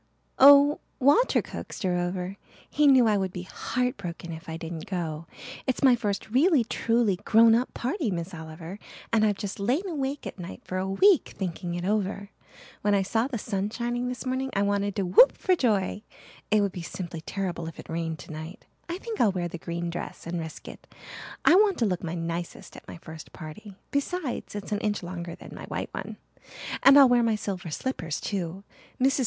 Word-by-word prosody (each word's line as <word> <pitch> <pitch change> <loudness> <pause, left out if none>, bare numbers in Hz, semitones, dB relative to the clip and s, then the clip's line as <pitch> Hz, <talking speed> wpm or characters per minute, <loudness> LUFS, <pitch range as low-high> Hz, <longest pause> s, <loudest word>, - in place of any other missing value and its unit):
"Oh, 285 +2 +8 0.2
Walter 290 - +4
coaxed - - -7
her 180 -1 +1
over. 180 +2 -2 0.3
He 300 0 +3
knew 260 -3 +7
I 215 -2 +3
would 190 -1 -1
be 180 0 -6
heart 250 +6 -2
broken 175 -3 -6
if 160 +1 -9
I 160 - -4
didn't 165 -1 -6
go. 165 -4 -4 0.4
It's 260 +2 -1
my 260 -2 +7
first 210 -2 -3
really 285 - +4
truly 230 -3 +1
grown 225 +4 +5
up 240 +3 +1
party, 260 - -1
Miss 175 0 -4
Oliver, 160 +3 -8 0.3
and 220 -1 +4
I've 205 -2 +2
just 205 -2 -5
lain 260 - 0
awake 285 -4 -3
at - - -7
nights 180 +1 -8
for 185 - -3
a 190 +1 -2
week 370 - +4
thinking 175 -2 -3
it 175 0 -3
over. 200 0 -1 0.5
When 205 0 +3
I 195 - +2
saw 225 +5 0
the 265 -4 -3
sun 200 -2 -2
shining 240 +2 -2
this 250 0 -5
morning 260 +1 -1
I 200 - +2
wanted 200 0 0
to 195 - 0
whoop 185 +9 +6
for 370 - +2
joy. 210 - +1 0.5
It 215 -1 +4
would 200 -1 +1
be 180 - -6
simply 170 -1 -6
terrible 180 -2 -4
if 165 - -8
it - - -10
rained 165 -1 -3
tonight. 160 +6 -9 0.2
I 345 - -2
think 450 +2 -4
I'll 215 - +5
wear 180 -2 -2
the 175 0 -7
green 170 +1 -4
dress 175 - -6
and 170 +1 -3
risk 160 -1 -7
it. - - -11 0.6
I - - +7
want 400 +1 +5
to 235 - +2
look 180 -4 -1
my 170 0 -3
nicest 170 0 -5
at - - -13
my - - -8
first 160 -1 -11
party. 185 +5 -10 0.2
Besides, 285 - -2
it's 205 +1 -6
an 205 - 0
inch 205 -2 -1
longer 170 -1 -6
than - - -12
my - - -8
white - - -4
one. - - -6 0.6
And 275 +1 +8
I'll 275 -2 +9
wear 245 -1 +4
my 230 -2 +2
silver 190 -4 -4
slippers 165 - -3
too. 190 -1 -4 0.4
Mrs. 270 +2 +3
200 Hz, 205 wpm, -27 LUFS, 175-245 Hz, 0.6 s, I'll